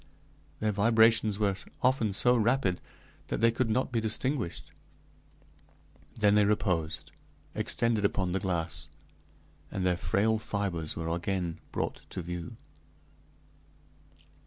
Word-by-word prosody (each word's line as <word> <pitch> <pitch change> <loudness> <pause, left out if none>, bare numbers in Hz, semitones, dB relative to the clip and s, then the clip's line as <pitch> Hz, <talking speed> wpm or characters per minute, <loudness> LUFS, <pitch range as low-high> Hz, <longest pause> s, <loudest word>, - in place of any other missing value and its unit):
Their 110 0 +2
vibrations 110 0 +4
were 100 -2 +1 0.3
often 125 -5 +3
so 125 +5 +5
rapid 115 -5 +1 0.5
that - - -2
they 115 +1 +4
could 115 0 -1
not 125 +4 0
be 115 -2 0
distinguished; 110 - -2 1.4
then 105 -2 +3
they 105 0 +5
reposed, 90 -6 0 0.4
extended 115 -3 0
upon 95 -2 +1
the 95 - 0
glass, 85 -3 -3 0.8
and 95 -1 -3
their 90 -1 +3
frail 105 +6 +1
fibers 95 -7 -3
were 80 0 -3
again 85 0 -2
brought - - -3
to 90 - -5
view. 85 0 -6
100 Hz, 115 wpm, -29 LUFS, 90-110 Hz, 1.4 s, so